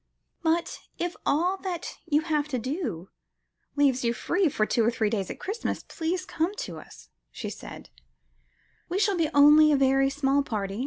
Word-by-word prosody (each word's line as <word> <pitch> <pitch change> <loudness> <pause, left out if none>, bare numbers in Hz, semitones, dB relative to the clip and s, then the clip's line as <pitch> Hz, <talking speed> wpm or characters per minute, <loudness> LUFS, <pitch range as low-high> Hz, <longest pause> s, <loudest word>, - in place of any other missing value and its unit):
"But 335 +1 0 0.2
if 350 0 -3
all 355 +6 +2
that 365 -3 -5
you 300 -1 +3
have 305 -2 -1
to 270 -4 -2
do 245 - -4 0.7
leaves 275 -3 +2
you 235 0 +1
free 355 +6 +1
for 215 -5 0
two 230 - +1
or 225 - +3
three 220 -3 0
days 200 -5 -2
at - - -7
Christmas, 415 +5 -3
please 360 +2 -3
come 345 +1 -2
to 170 - -6
us," - - -15 0.2
she - - -6
said; - - -10 1.0
"we 360 - -1
shall 405 -1 +2
be 330 -3 +1
only 300 +2 +7
a 290 - +4
very 270 0 +3
small 275 0 +1
party. 205 -6 -3
290 Hz, 175 wpm, -27 LUFS, 245-345 Hz, 1.0 s, only